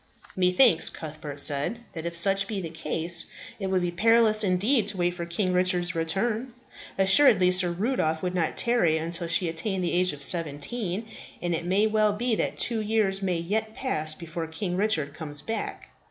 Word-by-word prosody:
"Methinks," 180 +1 +4
Cuthbert 155 -2 -6
said, 145 +9 +2 0.2
"that 165 0 -5
if 170 - -5
such 195 +3 +2
be 205 -2 -4
the 165 -4 -6
case 165 +1 +1 0.3
it 195 - -3
would 190 -1 0
be 175 - -1
perilous 220 +3 +3
indeed 205 +6 +1
to 200 - -2
wait 175 0 0
for 170 -1 -6
King 180 +2 -1
Richard's 180 -1 +1
return. 215 +9 -2 0.4
Assuredly 190 -1 +5
Sir 180 -1 +2
Rudolph 170 -4 -1
would 180 0 -2
not 170 -3 -1
tarry 235 -10 +2
until 170 +2 -2
she 170 +2 +2
attained 185 +3 -3
the 175 - -1
age 180 +1 +2
of 145 -1 -7
seventeen, 175 - -1 0.3
and 175 0 -2
it 170 +1 -3
may 195 +4 +2
well 215 -1 +2
be 235 +3 -1
that - - -1
two 230 -2 0
years 210 -2 0
may 185 -3 -1
yet 215 +6 -3
pass 155 - 0
before 165 0 -6
King 180 +3 -4
Richard 170 -8 0
comes 150 -2 -5
back. 225 0 -5
180 Hz, 185 wpm, -26 LUFS, 165-215 Hz, 0.4 s, Assuredly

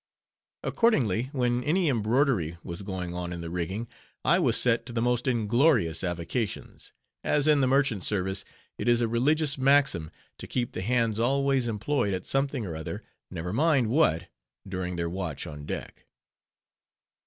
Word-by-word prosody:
Accordingly, 130 - +1
when 125 -3 0
any 170 +5 +1
embroidery 115 - +1
was 85 +2 -6
going 95 -3 -5
on 90 0 -4
in 85 -1 -5
the 85 0 -6
rigging, 95 +6 -3 0.4
I - - +4
was - - +4
set 120 -2 +3
to 120 - -7
the 115 - -1
most 120 +2 0
inglorious 120 - +2
avocations; 90 +6 -4 0.3
as 145 0 +2
in 150 -2 +5
the 130 - +3
merchant 135 -7 +2
service 95 -1 0 0.4
it - - -3
is 120 0 +4
a 115 - +2
religious 140 +5 +1
maxim 135 - +3 0.3
to - - -7
keep 120 -2 -2
the - - -5
hands 115 0 +1
always 135 +1 +2
employed 105 -1 0
at 90 - -6
something 135 -3 -1
or 85 -4 -5
other, 80 0 -6 0.3
never 90 +3 -5
mind 135 -3 +2
what, 90 - +2 0.4
during 90 -1 -3
their 85 -1 -2
watch 90 -4 -4
on 75 -1 -8
deck. - - -7
115 Hz, 160 wpm, -27 LUFS, 90-135 Hz, 0.4 s, in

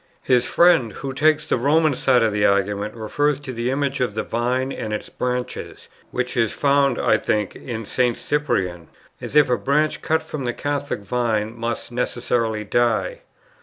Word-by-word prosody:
His 125 -1 +2
friend, 165 -11 +4
who 135 -1 -5
takes 155 +2 +2
the - - +1
Roman 155 +4 +3
side 125 -2 +3
of 110 -2 +1
the 105 0 0
argument, 100 +2 +1
refers 140 +6 0
to 130 -3 -6
the 120 +1 -2
image 140 0 -1
of 120 -5 -1
the 110 - -1
Vine 125 +3 -1
and 110 - -5
its 105 - -4
branches, 125 0 -4 0.2
which 125 +1 -3
is 115 -3 +2
found, 140 -2 +2
I - - +3
think, 105 -2 -1
in 115 -3 -6
St. 125 +2 0
Cyprian, 95 - -1 0.3
as - - -7
if 150 -1 +6
a 125 -3 +1
branch 150 +8 +1
cut 160 0 0
from 150 -4 -5
the 120 - -1
Catholic 145 -4 -3
Vine 110 0 -1
must 115 +1 -4
necessarily 120 -2 -1
die. 120 - 0
125 Hz, 175 wpm, -22 LUFS, 110-140 Hz, 0.3 s, if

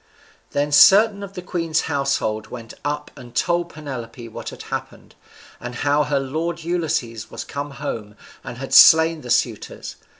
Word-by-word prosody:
] - - -33
Then 145 +1 0
certain 200 +7 +6
of 200 -1 -8
the 180 - -7
queen's 165 -3 -1
household 135 -7 -1
went 115 -2 -9
up 150 +1 -3
and 120 -2 -13
told 175 +2 0
Penelope 125 -6 -8
what - - -7
had - - -10
happened, - - -7 0.5
and 120 0 -7
how 145 +2 +1
her 145 -2 0
lord 160 +5 -3
Ulysses 155 -10 -2
was - - -6
come 140 +1 -5
home, 115 -7 -6 0.3
and 120 - -8
had 135 +1 -6
slain 160 0 +7
the 125 - -10
suitors. - - -2
145 Hz, 165 wpm, -21 LUFS, 125-165 Hz, 0.5 s, slain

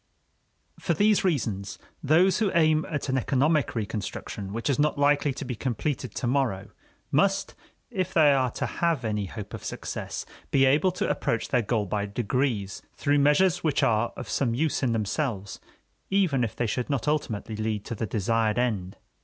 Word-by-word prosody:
For - - 0
these 210 0 +3
reasons, 110 - -1 0.2
those 175 +6 +4
who 210 -4 +1
aim 155 -2 +3
at 150 -3 -3
an 130 -1 +1
economic 140 +3 +1
reconstruction 100 -2 -4
which 115 +2 -3
is 140 -2 +1
not 150 0 +2
likely 145 0 +3
to 135 - -6
be 125 - -3
completed 130 +2 -3
to - - -3
morrow 120 -7 0 0.4
must, 195 +7 +2 0.4
if 185 -5 -2
they 150 -4 +5
are 130 -2 +2
to - - -3
have 165 -8 0
any 105 -2 -1
hope 105 0 -8
of - - -7
success, - - -5 0.2
be 135 -1 +4
able 150 +8 +4
to 180 - -1
approach 115 - -1
their 125 - +2
goal 110 -1 0
by 100 +1 -2
degrees, 110 -1 -1
through 145 0 +2
measures 170 +6 +3
which 155 -4 +1
are 110 +1 +2
of - - -6
some 120 -4 0
use 155 +4 0
in 125 -4 +1
themselves, 110 -2 -2 0.5
even 180 -10 +2
if 115 - -3
they 120 - -1
should 120 +4 -2
not 140 -2 -1
ultimately 115 -8 -1
lead 110 -1 -2
to - - -4
the 110 0 -3
desired 110 +1 0
end. 105 -7 -1
130 Hz, 180 wpm, -26 LUFS, 110-150 Hz, 0.5 s, they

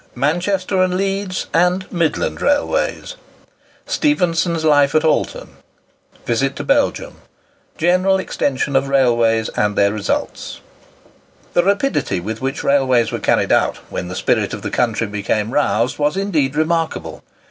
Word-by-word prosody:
MANCHESTER 185 +7 0
AND 185 0 +1
LEEDS, 195 -1 -2
AND 180 +2 +2
MIDLAND 170 -3 -1
RAILWAYS—STEPHENSON'S 285 - -2
LIFE 145 -2 +4
AT 155 - +3
ALTON—VISIT 135 -4 -3
TO - - -5
BELGIUM—GENERAL 185 +3 -1
EXTENSION 140 -6 -2
OF 135 +1 +2
RAILWAYS 120 -4 +2
AND 105 0 -1
THEIR 100 0 +2
RESULTS. 105 -2 -3 0.9
The 175 - +3
rapidity 200 - 0
with 110 +6 -5
which 135 +2 -3
railways 130 -5 +2
were - - -3
carried - - +1
out, - - +2
when 90 - -4
the 90 - -6
spirit - - 0
of - - -10
the - - -4
country 115 -2 0
became 105 +1 -2
roused, 145 - 0
was 150 +5 +1
indeed 155 -9 0
remarkable. 160 +1 -1
150 Hz, 125 wpm, -18 LUFS, 120-185 Hz, 0.9 s, LIFE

